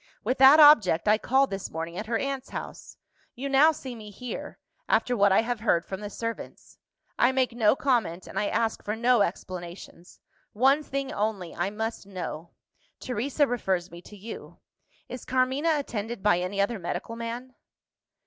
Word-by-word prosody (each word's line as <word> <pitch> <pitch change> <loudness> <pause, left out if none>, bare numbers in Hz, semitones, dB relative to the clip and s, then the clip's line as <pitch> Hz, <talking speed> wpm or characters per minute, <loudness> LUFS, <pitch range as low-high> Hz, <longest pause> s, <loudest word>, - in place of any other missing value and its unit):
With 255 +5 -1
that 270 +3 +8
object, 220 - +6
I 210 +1 +4
called 265 +1 +2
this 195 -1 -4
morning 165 +1 -5
at 210 +4 -5
her 230 0 0
aunt's 275 +1 -4
house. - - -8 0.4
You 270 +3 -4
now 275 +4 +5
see 265 -4 -8
me 215 -3 -10
here 245 +5 -7 0.3
after 245 - +2
what 200 -2 +4
I 190 - +5
have 240 -1 -3
heard 175 -6 +1
from 190 - -6
the 205 - -5
servants. 230 +2 -7 0.4
I 245 - +5
make 260 -1 +1
no 230 -1 +3
comment, 230 -11 0
and - - -4
I 205 - 0
ask 225 +1 -1
for 210 - -2
no 240 0 +3
explanations. 175 -1 -5 0.3
One 270 +7 +4
thing 275 -2 -4
only, 205 -4 -2
I 175 +3 -1
must 220 0 -5
know. 175 -3 -6 0.5
Teresa 260 +5 0
refers 190 -8 -2
me 170 0 -10
to 210 +3 -14
you. 215 +4 -9 0.5
Is 250 - -8
Carmina 260 +5 +1
attended 230 -6 -5
by 205 -4 +4
any 185 +3 -3
other 200 +2 0
medical 175 +6 -5
man?" 235 +2 -6
225 Hz, 175 wpm, -27 LUFS, 195-255 Hz, 0.5 s, that